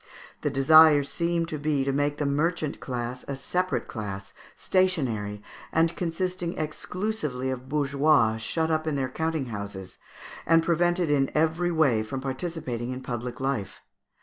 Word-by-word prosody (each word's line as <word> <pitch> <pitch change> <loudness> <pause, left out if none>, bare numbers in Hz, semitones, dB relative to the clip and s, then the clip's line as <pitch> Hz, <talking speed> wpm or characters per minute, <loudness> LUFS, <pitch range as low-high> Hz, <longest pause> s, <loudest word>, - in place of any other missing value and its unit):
The 145 - 0
desire 145 +2 +7
seemed 170 +3 -1
to 155 - -4
be 145 -2 +1
to 135 - 0
make 145 +1 0
the 150 - -1
merchant 155 +2 0
class 125 0 -4
a 140 - -3
separate 180 +7 -1
class, 100 -3 -6 0.2
stationary, 120 - 0 0.3
and 165 +1 +2
consisting 175 0 -2
exclusively 155 -4 -3
of 130 0 -6
bourgeois, 140 -5 +3
shut 160 +9 -1
up 155 0 0
in 155 - 0
their 135 -2 -1
counting 160 +1 -2
houses, 100 -2 -7 0.5
and 165 0 +5
prevented 175 -1 +2
in 135 -2 +2
every 160 +3 +2
way 140 -9 +3
from 110 +5 -4
participating 130 -3 -4
in 130 0 -4
public 120 0 -5
life. 130 -8 -2
145 Hz, 150 wpm, -26 LUFS, 125-165 Hz, 0.5 s, desire